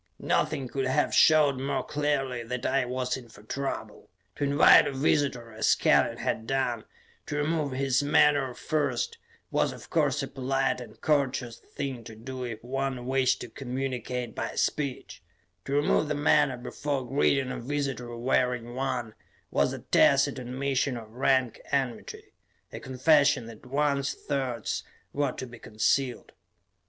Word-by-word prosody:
Nothing 135 -2 0
could 135 +1 -2
have 135 +3 +1
showed 150 -4 +5
more 135 +1 -1
clearly 145 -4 -1
that 125 +2 -5
I 135 -2 +2
was 125 0 -2
in 120 -3 -12
for 105 - -16
trouble. 140 +5 -5 0.3
To - - -2
invite 140 +1 +7
a - - -1
visitor, 130 -3 0
as 110 - +2
Kellen - - +3
had 110 - -2
done, 125 -4 -1 0.4
to 150 - -3
remove 150 -2 0
his 135 0 +1
menore 145 -3 +3
first, 145 -6 -1 0.3
was, - - +1
of - - -12
course, 150 -3 +1
a - - -3
polite 135 -1 -1
and 110 -3 -12
courteous 135 -5 0
thing 135 -4 -6
to 115 - -9
do 130 +3 -7
if 115 -3 -6
one 130 0 -3
wished 130 0 +1
to - - -6
communicate 125 -1 -4
by - - -4
speech; 140 -4 -2 0.4
to 135 - -3
remove 145 +1 +2
the 150 - -1
menore 140 -2 +3
before 135 +1 -3
greeting 135 0 +2
a - - -4
visitor 130 -2 -3
wearing 125 -1 0
one, 130 -4 -2 0.4
was 70 0 +2
a - - -4
tacit - - +4
admission 130 +1 -1
of 110 -2 -10
rank 130 -1 +1
enmity; 130 -4 -3 0.4
a - - -5
confession 140 0 +3
that 115 +1 -12
one's 140 0 0
thoughts 130 -6 -3 0.3
were 140 -2 0
to 130 - -6
be 120 -1 -12
concealed. 125 +5 0
130 Hz, 150 wpm, -28 LUFS, 125-140 Hz, 0.4 s, invite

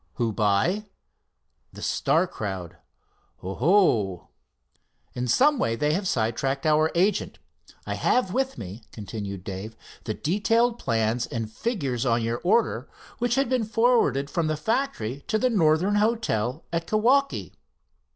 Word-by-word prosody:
"Who 115 -3 -1
by?" 110 - +1 0.9
"The - - -10
Star - - +2
crowd." 95 -5 -6 0.7
"Oh!" 110 - +2 0.8
"In 125 0 -3
some 275 - +4
way 115 - +1
they 150 +5 +1
have 190 +3 -1
sidetracked 135 +3 -1
our 155 +1 +4
agent. 190 +5 +1 0.5
I - - -3
have 220 -7 +1
with 265 0 -1
me," 100 +3 -8
continued 100 -3 -6
Dave, 105 +3 -7 0.3
"the 110 - -2
detailed 225 +7 +1
plans 115 +1 0
and 115 -2 -4
figures 135 - -2
on 120 -2 +1
your 115 +1 -2
order, 215 +6 +1 0.3
which 240 0 +1
had 270 -1 +2
been 255 -2 +1
forwarded 225 - +2
from 170 -2 0
the 155 -1 -1
factory 150 - -2
to 220 - +1
the 255 +3 +1
Northern 180 +1 +3
Hotel, 170 - 0
at 165 0 -1
Kewaukee." 255 +6 +2
155 Hz, 135 wpm, -25 LUFS, -, 0.9 s, some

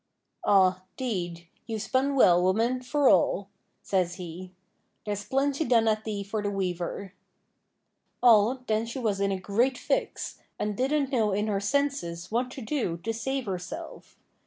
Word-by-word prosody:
'Aw, 185 -2 +4 0.2
'deed, 175 -9 -3 0.2
you've 220 -2 -3
spun 265 +6 +1
well, 180 -9 +6
woman, 225 +7 +1
for 280 +2 +1
all,' 190 +1 +3 0.3
says 180 -3 0
he; 180 0 -8 0.5
'there's 205 -1 -3
plenty 275 +5 +1
done 230 -5 +3
at 215 0 +1
thee 205 -2 -3
for 210 +2 -3
the 205 - -1
weaver.' 185 0 -3 1.1
Aw, 235 +1 +6
then 220 0 0
she 235 - -6
was 215 -6 0
in 200 0 +2
a 190 - -1
great 235 +7 +1
fix, - - -2 0.2
and 210 -1 -2
didn't 275 +3 0
know 220 -6 +2
in 210 +2 0
her 205 -2 0
senses 205 -8 -1
what 245 +3 0
to 260 -1 -8
do 220 - -1
to 225 +2 -1
save 265 +3 -2
herself. 185 -3 -7
215 Hz, 160 wpm, -27 LUFS, 190-255 Hz, 1.1 s, well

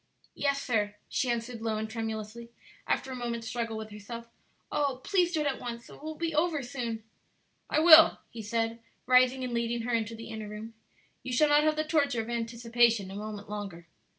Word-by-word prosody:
"Yes, 280 -1 0
sir," 210 -4 0
she 255 - 0
answered, 235 0 -2
low 220 -1 -1
and 220 0 -2
tremulously, 220 +1 -5 0.4
after 265 - 0
a - - -4
moment's 235 -2 -3
struggle 230 -1 -3
with 220 0 -7
herself. 230 +3 -8 0.4
"Oh, 280 -3 0
please 360 -4 +2
do 320 -3 0
it - - -1
at 280 -2 -1
once, 235 -1 -6
so - - -13
it - - -14
will 310 +1 -5
be 330 0 -2
over 310 -2 +1
soon!" 235 -3 -4 0.7
"I 310 - +2
will," 325 -1 +9
he 230 - -7
said, 225 +2 -1 0.3
rising 255 +1 +4
and 250 -1 -3
leading 235 0 -1
her 245 +1 -2
into 225 0 0
the 230 0 -9
inner 220 -1 -6
room; 215 +2 -8 0.5
"you 255 - -6
shall 295 +5 +4
not 295 +1 +5
have 310 0 +3
the 310 - 0
torture 285 -5 +1
of 225 +2 -6
anticipation 230 -3 +1
a - - -7
moment 210 0 -6
longer." 200 -5 -6
235 Hz, 205 wpm, -29 LUFS, 220-270 Hz, 0.7 s, will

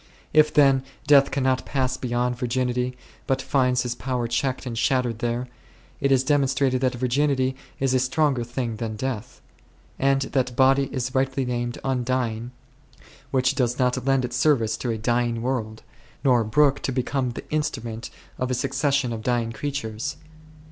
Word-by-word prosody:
If, 155 0 +5
then, 135 -2 +5 0.2
death 140 -1 +6
cannot 130 -2 +1
pass 130 -2 -1
beyond 125 0 -1
vir 125 0 -3
ginity, 125 0 -1 0.3
but 135 0 +1
finds 125 -2 +1
his 120 -1 -2
power 125 -2 -2
checked 130 +3 -1
and 120 -2 -4
shattered 125 -1 +1
there, 120 +1 -2 0.5
it 140 - +1
is 130 -1 +4
demonstrated 135 -2 +2
that 130 -1 +1
virginity 130 +1 +1 0.2
is 135 -1 +1
a 130 - +4
stronger 130 0 +1
thing 120 -1 -3
than 110 -1 -4
death; 125 0 -5 0.6
and 135 0 +2
that 125 -3 0
body 135 +1 +4
is 130 -1 -3
rightly 135 0 0
named 120 -1 -2
undying 125 -3 -1 0.8
which 130 -1 +2
does 125 -2 0
not 125 -1 +1
lend 135 -1 +2
its 125 0 -4
service 120 -7 +2
to 125 - -3
a 115 - -1
dying 120 +1 0
world, 115 -4 -3 0.4
nor 125 -4 +4
brook 140 +5 +3
to - - -2
become 130 0 -1
the - - -8
instrument 120 -7 -3 0.3
of 130 - -1
a 125 - 0
succession 135 0 0
of 110 - -5
dying 120 -1 0
crea 145 +6 -3
tures. 110 -4 -4
130 Hz, 165 wpm, -24 LUFS, 120-135 Hz, 0.8 s, death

